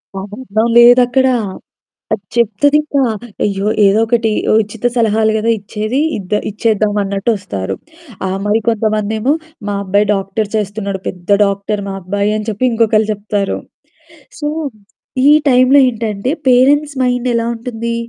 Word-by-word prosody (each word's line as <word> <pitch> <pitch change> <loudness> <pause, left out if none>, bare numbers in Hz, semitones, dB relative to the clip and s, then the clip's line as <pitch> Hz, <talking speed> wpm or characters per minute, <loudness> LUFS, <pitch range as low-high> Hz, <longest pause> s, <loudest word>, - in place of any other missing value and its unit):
సంబంధం 210 +3 -3
లేదక్కడ. 245 +2 +5 0.9
అది 210 -2 -3
చెప్తది 235 +6 +3
ఇంక 300 -1 -10 0.5
అయ్యో! 200 0 -1 0.2
ఏదో 200 +2 +4
ఒకటి 230 -1 +1 0.3
ఉచిత 210 +2 -7
సలహాలు 220 -2 +2
కదా 220 +1 0
ఇచ్చేది. 215 +5 -3 0.2
ఇద్ద 195 -1 -6 0.2
ఇచ్చేద్దామన్నట్టు 205 -1 0
వస్తారు. 95 - -5 0.5
ఆహ్, 190 0 -2
మరి 210 +2 +2
కొంతమందేమో 220 +2 0 0.3
మా 205 - -1
అబ్బాయి 200 +2 +2
డాక్టర్ 195 +2 -2
చేస్తున్నాడు 200 -2 -3
పెద్ద 180 0 -7 0.2
డాక్టర్ 200 +1 -2
మా 195 - -4
అబ్బాయి 200 +3 -1
అని 215 +1 -5
చెప్పి 220 +4 -1
ఇంకొకళ్ళు 220 -2 +2
చెప్తారు. 205 -1 -2 0.8
సో, 295 - -2 0.8
ఈ - - +7 0.2
టైంలో 255 +2 +5
ఏంటంటే 225 0 -2 0.2
పేరెంట్స్ 285 +4 +3
మైండ్ 250 0 0
ఎలా 230 0 0
ఉంటుంది. 230 0 -4
215 Hz, 125 wpm, -15 LUFS, 200-235 Hz, 0.9 s, ఈ